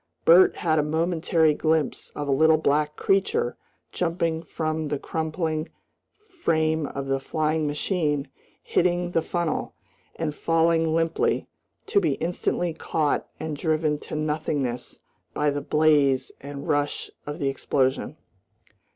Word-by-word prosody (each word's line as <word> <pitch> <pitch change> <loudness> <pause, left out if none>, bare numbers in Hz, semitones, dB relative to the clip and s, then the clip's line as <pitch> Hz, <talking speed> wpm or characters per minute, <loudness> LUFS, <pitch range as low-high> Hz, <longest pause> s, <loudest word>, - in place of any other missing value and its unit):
Bert 175 +3 +7
had 160 -2 +1
a - - +4
momentary 160 0 +2
glimpse 155 0 0
of 145 - -4
a - - +1
little 160 +3 +5
black 150 0 +1
creature 455 - +1 0.4
jumping 165 -2 -1
from 155 -1 -3
the 145 - -1
crumpling 160 +1 -2 0.6
frame 160 - 0
of 140 0 -5
the 135 0 0
flying 155 +2 0
machine, 150 -1 -1 0.4
hitting 175 0 +1
the 165 - +2
funnel, 170 -1 -2 0.4
and 160 -2 -2
falling 165 0 +2
limply, 165 0 +1 0.4
to - - +3
be 160 -6 +2
instantly 175 +1 -1
caught 155 -2 -1
and 155 -1 -3
driven 155 -1 0
to - - -7
nothingness 150 -5 -2 0.4
by 150 0 +2
the 145 0 -2
blaze 145 -3 +3
and 140 0 -7
rush 145 0 -1 0.2
of 145 - -4
the 140 - 0
explosion. 135 -1 0
155 Hz, 130 wpm, -25 LUFS, 145-165 Hz, 0.6 s, Bert